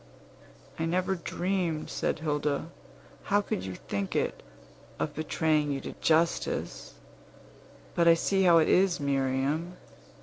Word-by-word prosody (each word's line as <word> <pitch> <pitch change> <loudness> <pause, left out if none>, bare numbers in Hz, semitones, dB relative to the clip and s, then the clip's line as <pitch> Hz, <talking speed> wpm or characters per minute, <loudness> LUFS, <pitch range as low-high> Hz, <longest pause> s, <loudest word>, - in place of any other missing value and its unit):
"I 165 - 0
never 180 +3 0
dreamed," 175 -2 -2
said - - -1
Hilda, 150 +1 -1 0.5
"how 205 - +3
could 200 - -3
you 95 -1 -5
think 100 +1 -4
it? - - -1 0.6
of 80 - -2
betraying 155 -1 0
you 140 - -2
to - - -7
justice. 165 +1 0 1.0
But 170 - +2
I 165 - +8
see 195 +3 +1
how 175 -3 +6
it 160 - +4
is, 185 -1 +3
Miriam. 140 +5 -1
160 Hz, 130 wpm, -29 LUFS, 145-175 Hz, 1.0 s, I